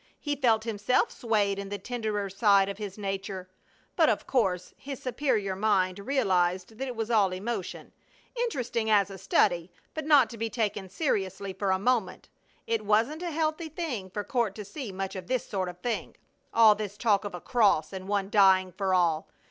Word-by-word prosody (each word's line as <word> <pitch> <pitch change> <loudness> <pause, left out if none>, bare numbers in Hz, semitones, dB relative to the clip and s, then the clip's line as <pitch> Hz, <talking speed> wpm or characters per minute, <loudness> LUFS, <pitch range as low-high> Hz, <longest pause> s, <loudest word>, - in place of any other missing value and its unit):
He 290 -1 -2
felt 230 -5 +2
himself 220 +1 +1
swayed 205 -4 0
in 200 0 -6
the 205 - -3
tenderer 215 -4 -3
side 195 0 +3
of 200 +1 -6
his 205 -2 -6
nature, 195 -2 -4 0.5
but - - +4
of - - 0
course 190 -8 0
his 275 -1 -7
superior 235 -7 -1
mind 190 -2 +1
realized 190 -5 0
that 270 - -2
it 250 - -5
was 225 +1 -3
all 205 -5 +4
emotion; 195 +1 -5 0.4
interesting 250 - -1
as 205 -2 +4
a 190 - -9
study, 175 -2 +2 0.2
but 315 -1 -5
not 285 -6 +6
to 230 - -9
be 225 0 -1
taken 210 -4 -2
seriously 195 - -2
for 195 +1 -2
a 190 - +3
moment. 210 -2 -1 0.4
It 225 -2 -1
wasn't 225 +10 +1
a 355 - -2
healthy 315 +1 -1
thing 280 - -4
for 205 +3 -4
Court 235 -7 -1
to 210 - -7
see 235 +2 -6
much 195 +1 -4
of 185 -2 -7
this 255 -2 -1
sort 190 -3 -2
of 175 - -9
thing. 240 -2 -3 0.3
All 225 -2 +7
this 205 -1 -6
talk 210 -3 +2
of 200 -3 -5
a - - -6
cross, 200 -7 +2
and 190 0 -6
one 200 -1 -1
dying 190 -2 +5
for 190 0 0
all! 165 -3 +1
205 Hz, 190 wpm, -28 LUFS, 190-235 Hz, 0.5 s, All